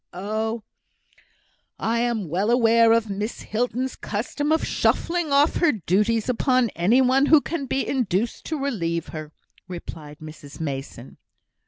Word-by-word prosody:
"Oh, 220 +4 -3 1.1
I 230 +1 0
am 235 -5 -1
well 185 +7 0
aware 230 -1 +5
of 230 -1 +3
Miss 205 +3 -4
Hilton's 245 +3 -2
custom 255 +8 -3
of 320 - +2
shuffling 340 -3 0
off 280 +2 +4
her 340 -3 +4
duties 210 +3 +1
upon 255 -1 +2
any 210 +10 +3
one 265 +2 +3
who 310 0 +7
can 290 -2 -4
be 270 +2 -1
induced 230 -4 -1
to 315 - -3
relieve 170 - -2
her," 155 -2 -7 0.4
replied 160 -4 -8
Mrs 155 -2 -11
Mason. 135 -4 -6
225 Hz, 140 wpm, -23 LUFS, 180-260 Hz, 1.1 s, who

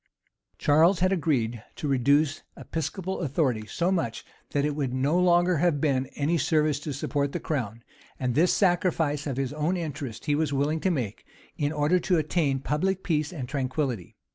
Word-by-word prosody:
Charles 165 +5 +4
had 185 +1 +3
agreed 120 - 0
to 150 - -4
reduce 140 +3 +2 0.2
episcopal 180 +4 -4
authority 135 -8 0
so 175 - 0
much, 140 -12 -2 0.2
that 145 0 0
it 150 -1 -1
would 140 -4 -1
no 140 +7 +2
longer 175 -1 +4
have 160 -2 +2
been 135 -3 +1
of - - -23
any 160 +4 +1
service 150 -2 +2
to 150 +1 -5
support 140 +1 -2
the - - -2
crown; 115 -7 -3 0.4
and 125 -2 0
this 170 +7 +4
sacrifice 165 -6 +1
of 135 -3 -3
his 135 0 -2
own 155 +5 0
interests 145 -8 -5
he 145 - +1
was 150 0 0
willing 145 +3 0
to 190 - +1
make, 125 - -3 0.3
in 145 0 -1
order 155 +4 +2
to 180 0 +1
attain 155 -3 +1
public 190 +7 -1
peace 155 -2 0
and 140 -8 -5
tranquillity. 130 - -2
150 Hz, 180 wpm, -27 LUFS, 135-170 Hz, 0.4 s, Charles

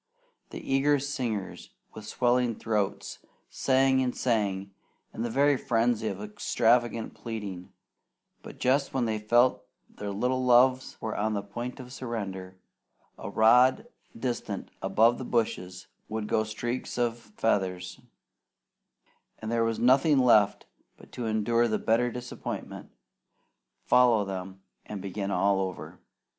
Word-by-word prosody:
The - - -8
eager 140 +2 +2
singers, 125 -8 -4 0.2
with 110 -1 -10
swelling 120 -1 +1
throats, 105 -3 -2 0.3
sang 130 0 +2
and 125 -1 -2
sang 100 -5 -1 0.4
in 115 - -4
a 120 - -2
very 140 +4 +3
frenzy 115 -3 0
of 100 -2 -4
extravagant 115 +2 +1
pleading, 105 -6 -7 0.7
but - - -11
just 135 +3 +1
when 125 -2 +1
they 110 -1 -1
felt 120 +4 +3
sure 100 0 -32
their 105 - -4
little 125 +6 -1
loves 125 +1 +4
were 110 -1 -4
on 110 +1 -1
the 100 - -2
point 120 +6 -6
of 125 0 -10
surrender, 95 -8 -5 0.6
a - - -6
rod 125 - +4 0.3
distant 120 0 -4
above 115 +2 +3
the - - -4
bushes 90 -7 -2 0.2
would 110 0 -3
go 110 +1 +1
streaks 120 +4 -4
of 120 -1 0
feathers, 95 -5 -2 1.4
and 110 +1 -6
there 115 -1 +2
was 115 -1 0
nothing 135 +4 +4
left 110 -6 +4 0.3
but - - -17
to 120 -2 -4
endure 115 +2 +2
the 110 - 0
bitter 115 +2 +1
disappointment, 125 0 -7 1.0
follow 120 -4 +4
them, 95 0 -6 0.2
and 105 - -7
begin 100 +1 -4
all 100 0 +2
over. 95 -2 -5
115 Hz, 135 wpm, -28 LUFS, 105-125 Hz, 1.4 s, loves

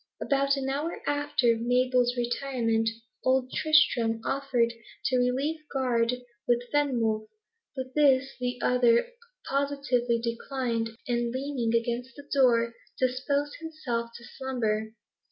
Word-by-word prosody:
About 275 0 +1
an 270 -1 -2
hour 290 +5 -2
after 290 -5 +2
Mabel's 250 +1 +2
retirement, 235 -2 0 0.3
old 260 0 +2
Tristram 245 -8 +3
offered 245 -4 +1 0.3
to 255 - +2
relieve 270 +6 0
guard 250 -2 0 0.2
with 240 0 +2
Fenwolf, 230 -7 +1 0.5
but 260 -1 -5
this 270 -3 +4
the 250 0 -2
other 245 - +4 0.4
positively 275 -4 +1
declined, 235 0 -2 0.2
and 240 -1 0
leaning 260 -3 -1
against 240 +2 -4
the 285 0 -12
door, 235 -4 +4 0.3
disposed 280 +3 0
himself 280 -8 -3
to 235 - -14
slumber. 220 -5 -2
250 Hz, 115 wpm, -28 LUFS, 235-275 Hz, 0.5 s, this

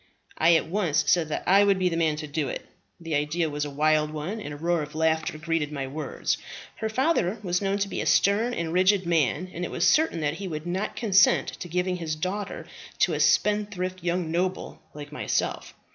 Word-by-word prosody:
I 165 +1 +6
at 160 - +2
once 165 -4 +1
said 165 -1 +2
that - - -3
I 195 +2 +6
would 200 -1 +3
be 185 -1 +1
the 170 - -1
man 160 -2 +1
to 155 0 -5
do 145 -1 -2
it; - - -5 0.3
the 165 -2 -5
ideas 150 +2 0
was 145 0 -2
a - - -4
wild 150 +1 +2
one, 155 +9 -5
and 150 - -6
a 145 - -7
roar 170 +1 0
of 150 0 -7
laughter 160 -1 0
greeted 155 -1 -1
my 140 -2 -3
words. 140 +1 -3 0.4
Her 220 - -2
father 235 - +1
was 180 -1 0
known 195 0 0
to 200 0 -1
be - - -3
a - - -3
stern 220 +5 +3
and 165 -1 -3
rigid 190 +1 +3
man, 170 +1 +1
and 175 - -5
it - - -3
was 175 +2 +1
certain 310 - +3
that 150 +1 -1
he 195 - -5
would 155 -2 -5
not 185 +4 -3
consent 205 -4 +4
to - - -8
give 180 +1 -1
his 170 -4 -2
daughter 190 +5 -4 0.3
to - - +2
a - - -2
spendthrift 205 -3 +1
young 175 -1 -1
noble 180 +2 -2
like 145 0 -8
myself. 150 - -2
170 Hz, 220 wpm, -26 LUFS, 155-190 Hz, 0.4 s, I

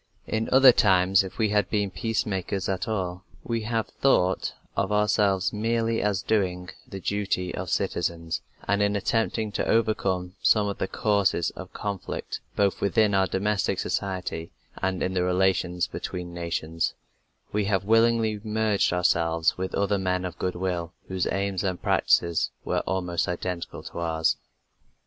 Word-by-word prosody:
In 110 0 -2
other 130 0 +9
times, 95 -3 +4
if 95 - -8
we 110 -2 +2
have 105 0 +1
been 105 -2 0
peace 105 +5 -1
makers 95 -1 -2
at 95 -2 -2
all, 95 -4 -2 0.2
we 115 -1 -2
have 115 -1 0
thought 95 -9 +1 0.2
of 100 - 0
ourselves 105 -2 +2
merely 115 +1 0
as 105 -2 0
doing 90 -4 0 0.2
the 95 - -7
duty 95 -2 -1
of 95 -1 -4
citizens, 85 0 -1 0.3
and, 100 +1 +2
in 100 0 +2
attempting 110 +1 0
to 105 - -2
overcome 95 -5 +1
some 105 -2 +4
of 100 - -4
the - - 0
causes 100 -6 +1
of - - -10
conflict 100 -3 -4 0.2
both 100 -1 +1
within 105 +1 +3
our 95 -1 +3
domestic 100 +2 0
society 90 -4 -3 0.3
and 95 -1 0
in 95 - -1
the 90 - +1
relations 90 -1 +1
between 90 -1 -6
nations, 85 -1 -2 0.6
we 105 -1 +1
have 100 -1 +1
willingly 115 -1 +3
merged 110 -2 +1
ourselves 85 -2 +2
with 95 0 -3
other 100 0 +1
men 90 -1 0
of 90 - -6
goodwill 90 -2 -2 0.2
whose 95 -1 -1
aims 100 -1 -1
and 95 -2 -1
practices 85 -2 +2 0.2
were - - +1
almost 90 -2 -1
identical 90 0 -4
to - - -7
ours. 80 -1 +1
95 Hz, 155 wpm, -26 LUFS, 90-105 Hz, 0.6 s, other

